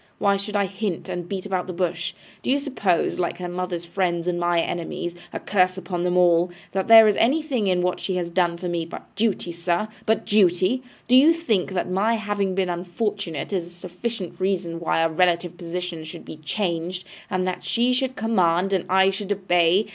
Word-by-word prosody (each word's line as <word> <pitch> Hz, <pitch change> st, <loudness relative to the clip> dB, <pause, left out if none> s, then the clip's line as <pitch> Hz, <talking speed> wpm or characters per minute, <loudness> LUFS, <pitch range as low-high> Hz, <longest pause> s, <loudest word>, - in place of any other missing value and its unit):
Why 200 Hz, -1 st, +3 dB
should 200 Hz, +2 st, -5 dB
I 200 Hz, -1 st, +3 dB
hint, 195 Hz, -1 st, -4 dB
and 175 Hz, -1 st, -4 dB
beat 195 Hz, -1 st, -4 dB
about 185 Hz, -2 st, -2 dB
the 180 Hz, -, -4 dB
bush? 175 Hz, 0 st, -2 dB, 0.3 s
Do -, -, -4 dB
you 270 Hz, -, +4 dB
suppose, 235 Hz, -, 0 dB
like 175 Hz, -, -1 dB
her 180 Hz, -, -5 dB
mother's 175 Hz, -1 st, -4 dB
friends 170 Hz, -1 st, -1 dB
and 175 Hz, -1 st, -1 dB
my 175 Hz, 0 st, +2 dB
enemies 175 Hz, +1 st, -3 dB, 0.2 s
a -, -, -4 dB
curse 185 Hz, -2 st, +1 dB
upon 180 Hz, -2 st, -4 dB
them 180 Hz, 0 st, +1 dB
all! 175 Hz, 0 st, +4 dB, 0.2 s
that 190 Hz, 0 st, -1 dB
there 225 Hz, -1 st, +9 dB
is 210 Hz, -, +3 dB
anything 265 Hz, -4 st, +1 dB
in 180 Hz, -1 st, +2 dB
what 180 Hz, 0 st, 0 dB
she 190 Hz, -, -2 dB
has 175 Hz, -1 st, -1 dB
done 170 Hz, -1 st, +1 dB
for 180 Hz, +1 st, -5 dB
me 170 Hz, -1 st, -1 dB
but 165 Hz, -, -10 dB
duty, 210 Hz, -5 st, 0 dB
sir, 170 Hz, +4 st, -1 dB, 0.2 s
but 220 Hz, 0 st, +1 dB
duty? 190 Hz, +4 st, +3 dB
Or 250 Hz, -, -22 dB, 0.2 s
do 250 Hz, -, +6 dB
you 295 Hz, +6 st, +7 dB
think 220 Hz, -, -1 dB
that 180 Hz, -1 st, -1 dB
my 200 Hz, +5 st, +1 dB
having 205 Hz, -3 st, -1 dB
been 190 Hz, -1 st, +1 dB
unfortunate 180 Hz, -1 st, -3 dB
is 175 Hz, -3 st, -1 dB
a -, -, -12 dB
sufficient 180 Hz, +3 st, -6 dB
reason 185 Hz, -3 st, -1 dB
why 165 Hz, -1 st, +1 dB
our 165 Hz, -, +1 dB
relative 175 Hz, 0 st, +1 dB
positions 175 Hz, -2 st, -5 dB
should -, -, -9 dB
be -, -, -9 dB
changed, 175 Hz, +2 st, -3 dB, 0.3 s
and 185 Hz, 0 st, -1 dB
that 185 Hz, -, -3 dB
she 245 Hz, +2 st, +1 dB
should 260 Hz, 0 st, -1 dB
command 195 Hz, -3 st, +1 dB
and 185 Hz, -, +1 dB
I 190 Hz, +1 st, +5 dB
should 195 Hz, +1 st, -5 dB
obey? 185 Hz, 0 st, +3 dB
185 Hz, 210 wpm, -23 LUFS, 175-205 Hz, 0.3 s, there